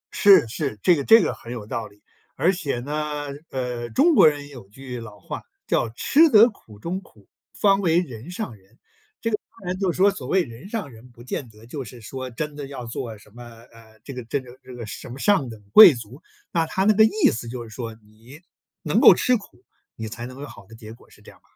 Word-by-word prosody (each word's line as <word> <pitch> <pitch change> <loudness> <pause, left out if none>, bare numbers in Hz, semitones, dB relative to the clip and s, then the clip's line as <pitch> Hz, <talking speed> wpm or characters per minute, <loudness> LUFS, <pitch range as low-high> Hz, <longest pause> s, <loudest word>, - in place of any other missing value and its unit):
是， 190 - +6
是， 120 0 -4
这 180 - +5
个 140 - -2
这 225 +6 +7
个 - - -1
很 115 - -11
有 115 -4 -6
道 110 0 -4
理， 100 0 -22 0.4
而 180 +3 +2
且 150 -9 -3
呢， 150 +2 -4 0.2
呃， 125 -2 -4
中 325 - +3
国 220 - +7
人 145 -1 -1
有 125 -9 -13
句 125 +2 -8
老 105 -3 -11
话 - - -7 0.2
叫 115 - 0
“吃 320 - +5
得 230 -1 +7
苦 110 - -17
中 180 - -4
苦， - - -22 0.3
方 195 -1 +4
为 170 -3 +2
人 125 -4 -7
上 180 - -5
人”， 95 -2 -25 0.4
这 230 - -1
个 210 - +1 0.2
当 190 - -11
然 180 - -1
就 190 -3 +1
说 195 +4 +3
所 200 - -8
谓 190 -1 +2
“人 120 +11 -12
上 210 - -4
人”， 115 +2 -15
不 120 -1 -16
见 125 0 -5
得 110 +1 -17
就 135 +3 -6
是 120 +1 -12
说 130 +3 -7
真 145 +5 -5
的 145 -1 -7
要 135 -3 -8
做 115 -1 -6
什 105 0 -20
么， 120 +3 -13 0.3
呃， 110 -1 -19
这 140 - -8
个 125 -1 -6
这 120 +5 -1
个 125 -1 -13
这 130 -1 -11
个 120 -2 -7
什 105 - -9
么 125 - -8
上 145 - +2
等 110 - -10
贵 180 -9 +10
族， 120 +5 -11 0.3
那 165 -1 0
它 190 - -1
那 215 +2 +5
个 220 +1 +6
意 220 0 +3
思 115 +1 -6
就 120 -1 -6
是 115 - -12
说 115 0 -6
你 110 +6 -17 0.4
能 - - +1
够 - - +9
吃 250 - +2
苦， 210 - -10 0.3
你 110 - -6
才 120 +2 -7
能 130 +1 -11
有 145 - -6
好 100 - -14
的 115 - -14
结 110 -1 -11
果， 115 - -20
是 - - -20
这 - - -13
样 - - -21
吧？ - - -44
130 Hz, 260 characters per minute, -23 LUFS, 115-180 Hz, 0.4 s, 贵